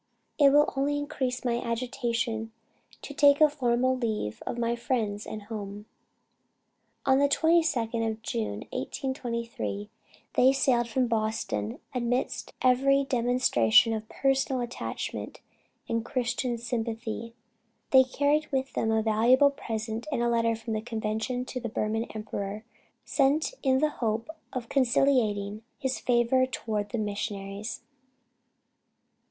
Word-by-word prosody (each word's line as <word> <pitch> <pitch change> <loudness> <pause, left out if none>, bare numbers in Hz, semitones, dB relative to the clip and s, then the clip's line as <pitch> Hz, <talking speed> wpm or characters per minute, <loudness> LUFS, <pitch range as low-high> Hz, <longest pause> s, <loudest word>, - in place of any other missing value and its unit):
It 285 -2 +8
will 295 +2 +4
only 285 +2 +1
increase 270 -4 -3
my 235 -1 +1
agitation 235 -1 -2 0.5
to 285 - -7
take 285 0 +5
a 310 - +8
formal 255 -3 +1
leave 215 - -2
of - - -3
my 235 0 0
friends 220 -4 -2
and 215 -1 -6
home." 205 -1 -7 1.2
On 265 0 +4
the 285 0 +4
22d 275 -9 +2
of 220 0 -6
June, 105 - -3
1823, 230 - -4 0.4
they 260 +1 +5
sailed 255 -3 +2
from 255 +3 +1
Boston 215 - -1 0.2
amidst 245 0 -1
every 275 +2 +4
demonstration 240 - +3
of 220 0 -5
personal 270 -1 +1
attachment 240 0 -5 0.5
and 230 0 -1
Christian 240 0 -1
sympathy. 230 -1 -4 0.6
They 265 -1 +8
carried 290 +4 +1
with 265 0 -1
them 225 - 0
a 220 0 +2
valuable 240 +6 +5
present 225 -2 -4
and 235 - 0
a 240 - +2
letter 230 -1 +2
from 225 0 -5
the 215 - -1
Convention 220 +2 -2
to 255 - -5
the 235 -1 -4
Burman 215 +2 -1
emperor, 210 -1 -5 0.4
sent 290 - +2
in 260 -2 +3
the 305 +3 +2
hope 225 +5 -1 0.2
of 250 -3 -4
conciliating 230 -6 +2 0.2
his 265 -1 -2
favor 245 +1 +3
toward 215 -5 -3
the 235 - -3
missionaries. 205 0 -4
235 Hz, 130 wpm, -28 LUFS, 220-260 Hz, 1.2 s, It